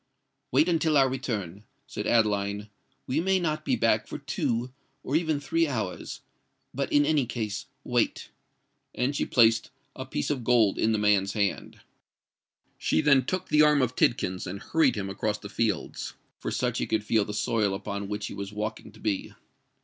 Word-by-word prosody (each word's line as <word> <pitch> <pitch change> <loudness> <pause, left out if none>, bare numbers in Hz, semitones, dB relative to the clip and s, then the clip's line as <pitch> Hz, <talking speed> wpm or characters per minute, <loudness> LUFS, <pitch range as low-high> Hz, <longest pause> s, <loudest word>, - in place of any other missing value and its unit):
"Wait 145 +6 +4
until 160 -3 +2
our 135 -1 +5
return," 105 -8 -4 0.2
said - - -5
Adeline: 105 -2 +1 0.3
"we 135 +5 0
may 190 +2 +2
not 155 -3 -1
be - - +1
back - - +2
for - - -5
two, 120 +2 -2 0.3
or 140 - -2
even 160 -3 +1
three 165 +3 +1
hours;—but 125 +3 -6
in 145 0 +4
any 145 -4 +2
case 110 -4 -4 0.2
wait." - - 0 0.6
And 130 +3 0
she - - -1
placed 115 -2 +4 0.3
a - - -7
piece 75 - -2
of 130 -4 -2
gold 115 -4 +3
in 110 - +3
the 110 - +2
man's 100 -2 +2
hand. 100 -3 -2 1.0
She - - +1
then 140 -4 +4
took 185 +3 -3
the 150 - +5
arm 150 -1 +5
of 125 0 -1
Tidkins 95 -5 +1
and 95 +3 -5
hurried 160 +9 +2
him 100 -2 -3
across 100 +2 -2
the 100 - -9
fields—for 110 0 -3
such - - -1
he - - -1
could 110 -1 0
feel 110 0 +2
the 105 - -6
soil 105 -3 +1
upon 100 0 -5
which 105 0 -3
he - - -6
was 100 0 -6
walking 105 +1 -5
to - - -16
be. 105 -3 -2
115 Hz, 175 wpm, -27 LUFS, 105-145 Hz, 1.0 s, our